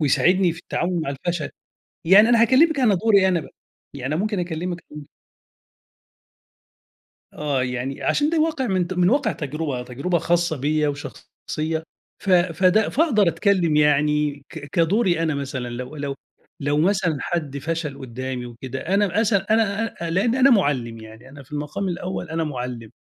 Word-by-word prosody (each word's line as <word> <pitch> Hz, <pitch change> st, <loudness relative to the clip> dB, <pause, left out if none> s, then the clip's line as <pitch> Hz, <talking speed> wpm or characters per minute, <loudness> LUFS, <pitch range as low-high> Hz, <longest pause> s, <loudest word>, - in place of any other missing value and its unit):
ويساعدني 175 Hz, +5 st, +3 dB
في 165 Hz, -, -11 dB
التعاون 175 Hz, -1 st, -2 dB
مع 140 Hz, -, -3 dB
الفشل. 155 Hz, +3 st, -3 dB, 0.6 s
يعني 205 Hz, +6 st, +7 dB
أنا 235 Hz, -1 st, +5 dB
هاكلمك 280 Hz, +6 st, +4 dB
أنا 225 Hz, -6 st, +4 dB
دوري 200 Hz, 0 st, +4 dB
أنا 180 Hz, -3 st, +2 dB
بقى، -, -, -12 dB, 0.4 s
يعني 135 Hz, +1 st, -4 dB
أنا 165 Hz, -, 0 dB
ممكن 210 Hz, -3 st, -1 dB
أكلمك 175 Hz, 0 st, -4 dB
أ 150 Hz, -1 st, -9 dB, 2.3 s
آه، 145 Hz, -3 st, -1 dB
يعني 125 Hz, +2 st, -4 dB
عشان 295 Hz, +1 st, +1 dB
ده 335 Hz, -, 0 dB
الواقع 310 Hz, -4 st, +1 dB
من 185 Hz, -4 st, 0 dB
ت 185 Hz, -, -5 dB
من 180 Hz, 0 st, +2 dB
واقع 275 Hz, +3 st, +2 dB
تجربة، 145 Hz, -3 st, -4 dB
تجربة 140 Hz, +9 st, -2 dB
خاصة 170 Hz, 0 st, +1 dB
بيّا 150 Hz, +2 st, 0 dB
وشخصية 155 Hz, +2 st, -5 dB, 0.4 s
ف 195 Hz, -, -2 dB
فده 185 Hz, +3 st, +3 dB
فاقدر 245 Hz, -, +3 dB
أتكلم 175 Hz, -4 st, +2 dB
يعني 150 Hz, -1 st, +2 dB
ك -, -, -8 dB
كدوري 175 Hz, 0 st, +2 dB
أنا 160 Hz, -2 st, 0 dB
مثلًا، 135 Hz, -3 st, -4 dB
لو 125 Hz, +5 st, -7 dB
لو 140 Hz, -1 st, -3 dB, 0.5 s
لو 145 Hz, +1 st, 0 dB
مثلًا 180 Hz, -1 st, +2 dB
حد 150 Hz, -5 st, -3 dB
فشل 155 Hz, -1 st, -4 dB
قدّامي 130 Hz, 0 st, -5 dB
وكده، 120 Hz, +2 st, -7 dB
أنا 200 Hz, +2 st, +1 dB
اسأل 205 Hz, -3 st, +1 dB
أنا 220 Hz, -1 st, +2 dB
أ 170 Hz, -6 st, -6 dB
أ -, -, -3 dB
لإن 200 Hz, +7 st, +1 dB
أنا 260 Hz, +1 st, +5 dB
مُعلم 135 Hz, -, +1 dB
يعني، 110 Hz, +3 st, -13 dB
أنا 140 Hz, +1 st, -12 dB
في 130 Hz, -, -21 dB
المقام 150 Hz, +6 st, -3 dB
الأول 180 Hz, 0 st, -4 dB
أنا 165 Hz, 0 st, -1 dB
مُعلم. 125 Hz, -6 st, -5 dB
165 Hz, 165 wpm, -22 LUFS, 140-195 Hz, 2.3 s, يعني